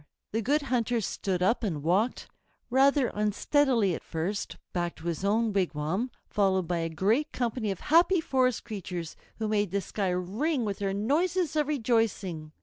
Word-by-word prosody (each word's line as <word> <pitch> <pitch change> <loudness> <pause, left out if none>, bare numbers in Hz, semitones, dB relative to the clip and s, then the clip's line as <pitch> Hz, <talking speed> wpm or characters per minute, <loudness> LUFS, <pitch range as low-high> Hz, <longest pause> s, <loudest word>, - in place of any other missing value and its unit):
The 225 - 0
Good 285 +7 +1
Hunter 245 -3 0
stood 190 -3 -2
up 230 +5 +2
and 160 -9 -2
walked, 195 +9 +1 0.4
rather 270 0 +4
unsteadily 210 +1 +2
at - - -5
first, 175 +6 -3 0.2
back 175 -1 -1
to 160 - -13
his 170 +1 -2
own 215 +2 +2
wigwam, 185 - -1 0.2
followed 190 -3 +1
by 175 0 0
a 165 0 -1
great 215 - +1
company 235 -3 -2
of 195 - -4
happy 345 +4 +4
forest 255 -6 +1
creatures, 180 -7 -6 0.2
who 220 - -2
made 210 -2 +1
the 200 +3 0
sky 195 +1 -2
ring 220 - -1
with 200 -2 -3
their 195 -1 -1
noises 320 - +1
of 300 -2 +2
rejoicing. 220 - 0
210 Hz, 165 wpm, -28 LUFS, 185-255 Hz, 0.4 s, rather